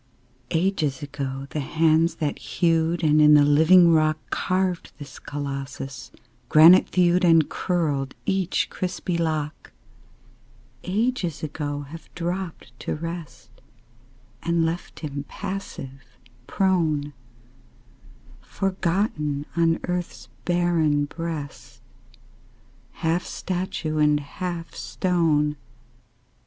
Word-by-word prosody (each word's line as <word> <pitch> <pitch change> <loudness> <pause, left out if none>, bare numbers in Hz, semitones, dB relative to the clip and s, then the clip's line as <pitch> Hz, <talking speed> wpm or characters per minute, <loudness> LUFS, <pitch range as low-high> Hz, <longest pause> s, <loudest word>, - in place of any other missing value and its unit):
Ages 160 -6 0
ago 135 -2 -5
the 155 - -2
hands 160 +3 +2
that 150 -3 -2
hewed, 165 0 0
And 155 0 +4
in 150 0 +7
the 145 -1 +6
living 165 +4 +6
rock 155 -1 +3
Carved 185 -1 -1
this 145 -4 -10
Colossus, 135 -2 -6 0.4
granite 165 +4 +7
thewed 180 0 +3
And 165 -3 +5
curled 150 -7 -1
each 190 -2 0
crispy 180 -1 -3
lock: 155 -2 -2 1.1
Ages 195 - -1
ago 145 -1 -3
have 155 +4 -11
dropped 175 -5 -4
to - - -3
rest 165 -4 -7 0.9
And 170 -1 +1
left 165 +2 -4
him 145 -2 -5
passive, 135 -10 -7 0.3
prone, 160 -7 +1 1.3
Forgotten 170 -6 -1
on 165 -1 +2
earth's 180 -1 -4 0.2
barren 170 -5 +2
breast, 145 -7 -7 1.1
Half 165 +1 0
statue 175 -4 -3
and 150 -1 +4
half 170 +3 -6
stone. 155 -5 0
160 Hz, 95 wpm, -24 LUFS, 145-175 Hz, 1.3 s, in